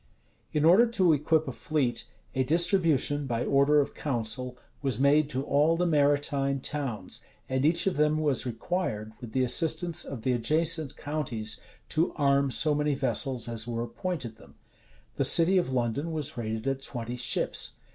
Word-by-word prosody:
In 150 0 +1
order 190 +9 +6
to 190 -8 +2
equip 155 +1 +1
a - - -3
fleet, 130 -4 -2 0.3
a 130 - 0
distribution, 160 -2 +2
by 120 -1 -2
order 140 +2 +3
of 140 - -1
council, 125 -1 -2 0.2
was 135 -6 -1
made 140 +3 +3
to 130 -2 -3
all 150 +4 +2
the 180 - +1
maritime 145 -3 +1
towns; 130 -9 -3 0.2
and 130 0 -1
each 165 +3 +3
of 190 -6 0
them 150 0 +2
was 150 -4 +1
required, 120 - -3
with 120 -3 -8
the 130 - +1
assistance 160 +5 +2
of 125 -5 -8
the 130 - +1
adjacent 155 +5 +1
counties, 120 -8 -4 0.3
to 160 +2 0
arm 140 -1 +2
so 150 +4 +4
many 150 -1 0
vessels 130 -1 0
as 115 -1 -3
were 115 -1 -3
appointed 120 -1 -5
them.[*] - - -18 0.6
The - - +1
city 185 +3 +5
of 175 - -2
London 130 +6 -1
was 155 -3 -4
rated 110 -2 -4
at 135 0 -2
twenty 120 -3 -5
ships. 125 0 -1
140 Hz, 165 wpm, -28 LUFS, 125-155 Hz, 0.6 s, order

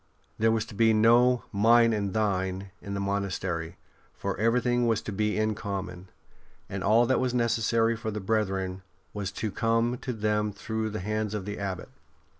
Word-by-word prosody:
There 110 +1 +4
was 110 -1 0
to 115 - -11
be 110 +2 +4
no 120 +3 +5
'' - - -34
mine 115 +2 +5
and 100 -2 -1
thine 95 -2 -1
" - - -38
in 100 0 -5
the - - -2
monastery, 95 -4 -2 0.4
for - - -2
everything 120 +2 +2
was 115 -2 +2
to - - -5
be 105 +1 0
in 110 0 +1
common, 95 -3 -5 0.6
and 100 -1 -5
all 115 +3 +5
that 130 - +2
was 125 -1 0
necessary 115 -1 +2
for 110 0 -4
the 105 0 -3
brethren 95 -3 -1 0.3
was 100 -2 -3
to 110 +1 -3
come 115 +3 +1
to 130 - -4
them 105 -2 0
through 110 +2 -3
the 110 -1 -5
hands 105 +1 -2
of 100 -3 -4
the 105 0 -5
Abbot. 95 -3 -4
110 Hz, 190 wpm, -28 LUFS, 100-115 Hz, 0.6 s, no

